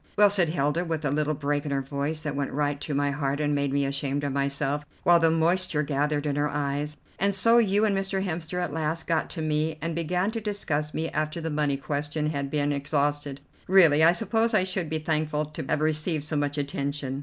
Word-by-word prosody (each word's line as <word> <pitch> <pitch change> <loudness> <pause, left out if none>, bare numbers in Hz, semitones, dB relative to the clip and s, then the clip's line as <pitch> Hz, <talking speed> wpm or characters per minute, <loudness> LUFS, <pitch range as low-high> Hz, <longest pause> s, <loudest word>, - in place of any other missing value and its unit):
'" - - -33
"Well," 205 -1 +6
said 180 -5 +3
Hilda, 155 +1 0
with 160 -3 -3
a 140 - +1
little 150 +1 0
break 145 0 -1
in 150 - -4
her 135 -1 -1
voice 145 +3 -3
that 150 -3 -3
went 140 -1 -2
right 145 0 -1
to 145 - -3
my 145 0 +1
heart 140 0 -1
and 150 -1 +1
made 140 -1 0
me 140 0 +1
ashamed 140 +1 -2
of 140 -2 -1
myself, 140 +1 -1 0.2
while 175 -1 +6
the 165 -1 +4
moisture 165 -1 +1
gathered 145 +1 0
in 145 -1 -1
her 145 0 +1
eyes, 145 +1 -2 0.2
"and 200 +1 +2
so 230 +4 +5
you 210 -1 +3
and 205 -2 +1
Mr. 195 0 -1
Hemster 170 0 -3
at 175 -5 -2
last 160 +1 -2
got 165 -2 0
to 160 - -5
me, 155 +1 0
and 165 +2 -3
began 180 +5 0
to 225 0 -4
discuss 155 -8 -2
me 160 +1 -1
after 155 +2 -2
the 160 -1 -3
money 150 -2 0
question 150 +2 -2
had 140 -2 -3
been 145 0 0
exhausted. 145 0 -1 0.3
Really, 165 -5 +6
I 165 - +7
suppose 225 +4 +1
I - - +4
should 185 -3 -3
be 160 - -1
thankful 155 -1 -1
to 150 - -7
have 150 -1 0
received 155 0 0
so 155 +1 -3
much 145 0 -1
attention. 140 -1 -3
150 Hz, 230 wpm, -26 LUFS, 145-165 Hz, 0.3 s, I